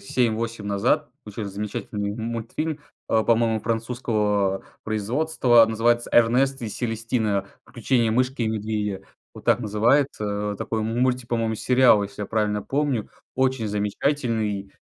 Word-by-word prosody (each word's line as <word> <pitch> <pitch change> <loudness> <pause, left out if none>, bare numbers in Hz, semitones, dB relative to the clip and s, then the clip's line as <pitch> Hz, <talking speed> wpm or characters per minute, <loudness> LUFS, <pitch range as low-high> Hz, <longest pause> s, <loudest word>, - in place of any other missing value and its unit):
7-8 115 -1 -1
назад 120 +8 +1 0.2
очень 105 +1 -5
замечательный 100 0 -4
мультфильм, 115 +7 -4 0.3
а, 110 - +2
по-моему, 115 -1 +2
французского 110 -4 -1 0.2
производства, 120 +2 +3
называется 120 +2 +1
"Эрнест 125 +3 +3
и 115 - -3
Селестина". 110 -3 -1 0.2
"Приключение 120 -1 0
мышки 130 +2 0
и 110 - +1
медведя". 105 -2 -2 0.3
Вот - - -12
так - - +3
называется. 105 -2 +1
Вот 100 - -6
такой 110 - -2
мультик, 125 +2 0
по-моему, 115 -2 0
сериал, 125 -2 +4
если 100 +1 -6
я 100 - -4
правильно 105 -2 0
помню. 135 -1 -1 0.2
Очень 130 -4 0
замечательный. 105 -1 -1
115 Hz, 125 wpm, -24 LUFS, 105-125 Hz, 0.3 s, сериал